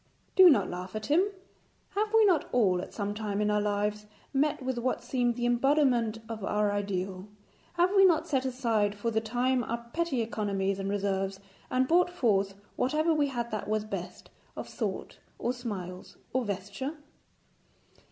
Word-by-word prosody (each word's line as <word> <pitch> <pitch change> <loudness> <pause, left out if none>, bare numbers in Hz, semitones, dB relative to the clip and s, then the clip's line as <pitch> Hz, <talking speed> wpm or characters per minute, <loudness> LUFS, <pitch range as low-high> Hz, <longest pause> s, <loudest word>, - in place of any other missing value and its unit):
Do 375 -1 +9
not 205 - +4
laugh 180 +3 -6
at 215 0 -4
him. 315 - +4 0.6
Have 425 +1 -1
we 445 -1 +6
not 360 -6 +2
all 190 -7 +3
at - - -8
some 205 -1 -3
time 210 -1 -3
in 210 0 +2
our 210 0 +2
lives 210 0 -1 0.3
met 285 +2 +2
with 255 -1 -2
what 255 +2 -1
seemed 245 -2 0
the 240 0 -2
embodiment 245 -2 +2
of 220 -3 -6
our 210 +1 +1
ideal; 195 -1 -3 0.5
have 350 +1 +3
we 390 - +7
not 330 -4 +4
set 265 -4 +1
aside 230 -6 0
for 230 +3 -2
the 220 0 +1
time 245 +3 +1
our 235 +1 -4
petty 330 -7 0
economies 195 -3 -1
and 195 0 -2
reserves, 195 -1 -1 0.3
and 255 0 +2
brought 350 +3 +4
forth 200 - +1 0.2
whatever 310 +5 +2
we 295 -2 +2
had 240 -3 -3
that 215 -2 -3
was 215 0 0
best, 215 - -7 0.3
of - - -5
thought, - - -4 0.2
or 245 - -1
smiles, 190 -7 -7 0.2
or 255 -1 +1
vesture? 200 - -4
230 Hz, 170 wpm, -29 LUFS, 205-265 Hz, 0.6 s, Do